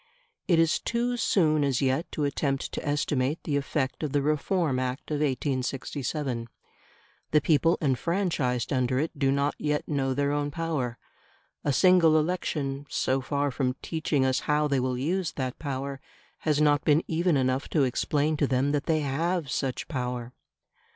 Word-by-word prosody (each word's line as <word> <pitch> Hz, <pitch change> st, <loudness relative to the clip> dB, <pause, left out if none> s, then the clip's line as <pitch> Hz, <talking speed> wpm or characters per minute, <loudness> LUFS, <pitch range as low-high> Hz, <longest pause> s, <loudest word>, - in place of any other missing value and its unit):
It 175 Hz, -, +4 dB
is 165 Hz, 0 st, +3 dB
too 240 Hz, +1 st, -1 dB
soon 155 Hz, -10 st, +2 dB
as 135 Hz, -3 st, +1 dB
yet 135 Hz, +4 st, 0 dB
to 150 Hz, -, -1 dB
attempt 140 Hz, -1 st, -1 dB
to -, -, -5 dB
estimate 145 Hz, -1 st, 0 dB
the 150 Hz, -, -1 dB
effect 135 Hz, -2 st, -1 dB
of 150 Hz, -3 st, -3 dB
the 145 Hz, -1 st, +2 dB
Reform 150 Hz, -1 st, +1 dB
Act 130 Hz, +3 st, -4 dB
of 150 Hz, -, +1 dB
1867. 135 Hz, -2 st, -2 dB, 0.8 s
The 150 Hz, -, +4 dB
people 165 Hz, +3 st, +3 dB
enfranchised 145 Hz, -, 0 dB
under 130 Hz, -1 st, +1 dB
it 155 Hz, +4 st, 0 dB
do 135 Hz, -2 st, +1 dB
not 140 Hz, +1 st, +1 dB
yet 150 Hz, -1 st, -1 dB
know 135 Hz, -3 st, 0 dB
their 140 Hz, +1 st, +1 dB
own 145 Hz, 0 st, 0 dB
power; 145 Hz, -6 st, -2 dB, 0.7 s
a 145 Hz, -, +1 dB
single 165 Hz, +1 st, +5 dB
election, 150 Hz, -4 st, -2 dB
so 130 Hz, +1 st, 0 dB
far 145 Hz, +1 st, -1 dB
from 125 Hz, -1 st, -1 dB
teaching 155 Hz, -4 st, 0 dB
us 130 Hz, 0 st, +2 dB
how 150 Hz, 0 st, +3 dB
they 140 Hz, -2 st, +1 dB
will 130 Hz, 0 st, -1 dB
use 165 Hz, +4 st, -1 dB
that 130 Hz, -2 st, -4 dB
power, 140 Hz, -1 st, -4 dB, 0.4 s
has 150 Hz, -2 st, +1 dB
not 145 Hz, -1 st, +3 dB
been 150 Hz, +2 st, +3 dB
even 170 Hz, -1 st, +2 dB
enough 130 Hz, +1 st, 0 dB
to 150 Hz, -, +2 dB
explain 145 Hz, +4 st, +1 dB
to 145 Hz, -, +2 dB
them 130 Hz, +2 st, +1 dB
that 145 Hz, -1 st, -1 dB
they 155 Hz, -1 st, +2 dB
have 155 Hz, +2 st, -1 dB
such 135 Hz, -3 st, -2 dB
power. 125 Hz, -3 st, -4 dB
145 Hz, 165 wpm, -27 LUFS, 130-155 Hz, 0.8 s, single